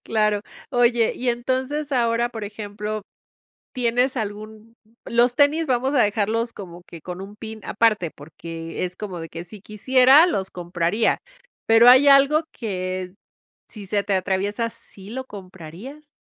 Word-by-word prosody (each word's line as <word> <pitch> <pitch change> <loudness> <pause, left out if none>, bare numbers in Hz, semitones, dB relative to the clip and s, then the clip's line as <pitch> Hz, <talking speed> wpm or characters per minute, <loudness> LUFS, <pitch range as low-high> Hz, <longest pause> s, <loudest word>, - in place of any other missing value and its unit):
Claro. 210 -2 +1 0.3
Oye, 240 -3 +3
y 250 - -3
entonces 260 +5 -2
ahora, 235 -1 +1
por 225 -3 -7
ejemplo, 210 0 -5 0.7
¿tienes 250 +2 0
algún?, 215 +1 -7 0.3
los 240 +1 +2
tenis 300 +3 +3
vamos 260 +1 0
a - - +4
dejarlos 220 +3 0
como 175 -3 -10
que 165 - -10
con 180 +3 -7
un 200 +2 -10
pin 220 0 -9
aparte, 210 -7 +1
porque 165 +3 -7
es 180 0 -4
como 190 -4 -6
de 165 0 -7
que 165 +1 -7
si 205 +3 -12
quisiera, 255 - +5
los 195 - -2
compraría. 175 +4 0 0.5
Pero 225 +2 +7
hay 260 +3 +7
algo 280 +3 +6
que, 185 -4 -4 0.6
si 205 -3 -8
se 200 +1 0
te 200 - -1
atraviesa, 195 +4 -1
¿sí 205 -3 -11
lo 260 +3 -5
comprarías? 200 - -11
215 Hz, 150 wpm, -22 LUFS, 190-245 Hz, 0.7 s, Pero